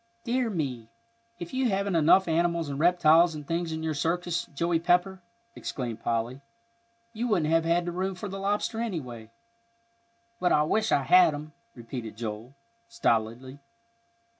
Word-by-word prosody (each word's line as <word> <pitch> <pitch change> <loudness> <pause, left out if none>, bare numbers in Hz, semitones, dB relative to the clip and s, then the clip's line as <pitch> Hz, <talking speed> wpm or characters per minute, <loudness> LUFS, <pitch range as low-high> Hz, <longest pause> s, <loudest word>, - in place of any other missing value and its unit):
"Dear 245 0 0
me, 130 - -4 0.5
if 175 -1 -8
you 260 -1 +1
haven't 195 -1 0
enough 165 +4 +5
animals 170 -1 0
and 140 0 -4
reptiles 170 0 +4
and 150 -1 -8
things 170 +2 -2
in 160 0 -4
your 160 -1 -1
circus, 170 +3 -1
Joey 170 +3 0
Pepper!" 180 +3 +1 0.3
exclaimed 120 -4 -5
Polly. 120 +3 -2 0.7
"You 235 +2 -2
wouldn't 170 -9 +1
have 165 0 +3
had 170 +1 +1
room 185 +2 -2
for 195 +3 -6
the 195 0 -6
lobster, 205 +3 -1
anyway." 125 - -5 1.1
"But 180 - +2
I 150 - +4
wish 220 +8 0
I 140 - +3
had 175 0 +5
him," 150 +1 -9 0.2
repeated 115 -2 -7
Joel, 115 +3 -6 0.3
stolidly. 130 - -1
165 Hz, 150 wpm, -27 LUFS, 140-185 Hz, 1.1 s, enough